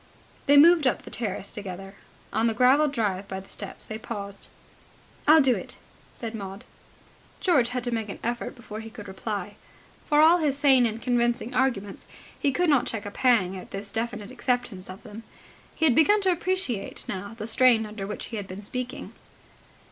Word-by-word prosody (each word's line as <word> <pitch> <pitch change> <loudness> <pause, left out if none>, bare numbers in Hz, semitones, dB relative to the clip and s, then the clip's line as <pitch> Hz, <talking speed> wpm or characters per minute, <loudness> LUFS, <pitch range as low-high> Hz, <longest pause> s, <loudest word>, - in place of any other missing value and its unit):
They 285 +1 +7
moved 325 -1 +7
up - - 0
the - - -11
terrace 200 -4 -3
together. 195 -1 -7 0.4
On 220 +2 +2
the 225 - 0
gravel 260 +5 +5
drive 205 -8 -1
by 190 -1 -5
the 195 - -14
steps - - -8
they 220 0 -6
paused. 200 -3 -7 0.8
"I'll 310 +1 +8
do 260 -2 +4
it!" - - -6 0.3
said 230 -1 -6
Maud. 200 +1 -7 0.7
George 280 - +3
had 250 -1 -3
to 245 - -2
make 220 -2 -2
an - - -6
effort 240 +1 -3
before 220 -3 -8
he 225 0 -8
could 215 -3 -10
reply. 205 +1 -5 0.5
For 295 -1 +3
all 325 +3 +7
his 290 -4 +1
sane 265 -4 +5
and 220 0 -4
convincing 240 0 0
arguments, 235 -7 -1 0.3
he 280 - +2
could 355 +6 +1
not 285 -5 +3
check 220 -2 -4
a 205 - -5
pang 210 -7 +2
at 185 - -9
this 200 +1 -5
definite 225 -1 -3
acceptance 245 -6 -2
of 185 +1 -10
them. 215 +1 -9 0.5
He 320 - +1
had 280 - +5
begun 410 - +5
to 380 -2 +3
appreciate 350 - -2
now 200 +4 -5
the 215 - -5
strain 225 0 +4
under 210 -2 -6
which 210 - -5
he - - -2
had 200 -2 -5
been 190 +2 -8
speaking. 250 +5 -5
230 Hz, 190 wpm, -26 LUFS, 205-260 Hz, 0.8 s, I'll